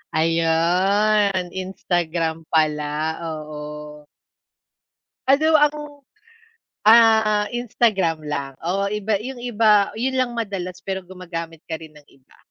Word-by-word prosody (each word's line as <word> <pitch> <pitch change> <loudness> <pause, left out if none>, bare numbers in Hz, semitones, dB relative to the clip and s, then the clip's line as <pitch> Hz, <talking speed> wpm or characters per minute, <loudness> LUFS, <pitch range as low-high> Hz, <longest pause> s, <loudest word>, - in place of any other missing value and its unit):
Ayun, 180 +4 +2
Instagram 170 -3 -2
pala, 155 0 0
oo. 150 -1 -8 1.2
Ano 310 +3 +4
ang 295 0 +3 1.1
ah, 220 -1 +5
Instagram 195 -9 0
lang 140 -2 -4
o 195 +4 -1
iba 210 +1 -1
yung 260 +2 -6
iba 220 -4 +2
yun 260 +3 -1
lang 250 -2 0
madalas, 195 -5 -5
pero 190 -1 -3
gumagamit 170 -3 -7
ka 160 -1 -5
rin 160 -1 -13
ng 150 - -16
iba? 135 -1 -25
185 Hz, 105 wpm, -22 LUFS, 160-215 Hz, 1.2 s, ah